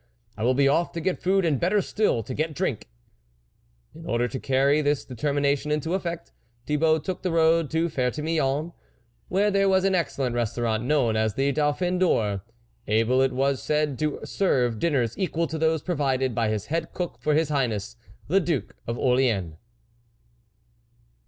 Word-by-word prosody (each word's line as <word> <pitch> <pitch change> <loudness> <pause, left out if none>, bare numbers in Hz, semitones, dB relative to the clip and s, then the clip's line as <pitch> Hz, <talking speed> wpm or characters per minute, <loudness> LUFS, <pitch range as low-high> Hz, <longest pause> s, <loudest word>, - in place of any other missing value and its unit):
I 110 - -5
will 130 +2 +3
be 140 +1 +4
off 165 +5 +1
to 170 - -3
get 185 +2 -2
food, 190 0 +2
and 150 -6 +1
better 190 +4 +2
still, 200 - 0
to 130 - -6
get 155 +2 -2
drink! - - -2 0.5
" - - -40
In 165 +2 -11
order 120 -2 +1
to 130 - -5
carry 135 +3 +2
this 145 -1 0
determination 140 +2 -1
into 150 +3 -1
effect, 170 -3 -4 0.3
Thibault 155 +1 +2
took 185 +1 -4
the 185 - -1
road 165 -1 +3
to 165 +1 +1
Ferte 130 -5 -1
Milon, 155 0 0 0.5
where 205 +3 +2
there 195 0 +3
was 190 -1 +3
an 195 0 +2
excellent 140 -8 -1
restaurant, 120 -1 -1
known 130 -6 +2
as 110 -1 0
the 140 +1 +1
Dauphin 155 +5 0
d'Or, 105 - +1 0.5
able 115 +4 +2
it 135 0 +2
was 135 -1 0
said 150 -1 0
to 155 -1 -1
serve 125 -11 +1
up 110 - -9
dinners 125 -8 0
equal 170 -3 0
to 160 0 -5
those 160 -1 +1
provided 135 -7 0
by 115 -1 0
his 105 -1 -2
head 165 +1 -3
cook 180 -2 -4
for 150 -1 +1
his 155 -1 +1
Highness, 120 -6 -1 0.3
the 190 +6 +3
Duke 165 -7 -2
of 115 +1 -2
Orleans. 120 -11 +1
145 Hz, 180 wpm, -25 LUFS, 125-165 Hz, 0.5 s, be